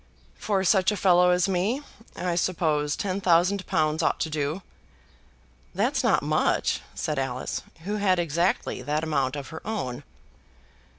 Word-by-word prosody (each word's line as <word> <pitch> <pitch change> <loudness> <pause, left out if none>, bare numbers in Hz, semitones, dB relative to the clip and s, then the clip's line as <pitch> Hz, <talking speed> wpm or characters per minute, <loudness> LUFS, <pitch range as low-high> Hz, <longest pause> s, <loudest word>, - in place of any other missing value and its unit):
"For 195 -3 -1
such 190 +2 +3
a 210 - -2
fellow 180 -2 +5
as 180 +1 +3
me, 195 +9 0 0.3
I 180 -1 -2
suppose 160 -4 0
ten 195 0 -2
thousand 185 +2 +3
pounds 155 0 +1
ought - - +1
to 160 - -1
do." 155 +5 -2 1.1
"That's - - +1
not - - +3
much," - - +1
said 150 -3 -2
Alice, 130 -2 -3 0.2
who 205 +4 -2
had 195 -3 +2
exactly 170 +2 0
that 150 +2 -1
amount 140 -4 0
of 140 -2 -6
her 160 - -8
own. 195 - -4
175 Hz, 145 wpm, -26 LUFS, 150-190 Hz, 1.1 s, fellow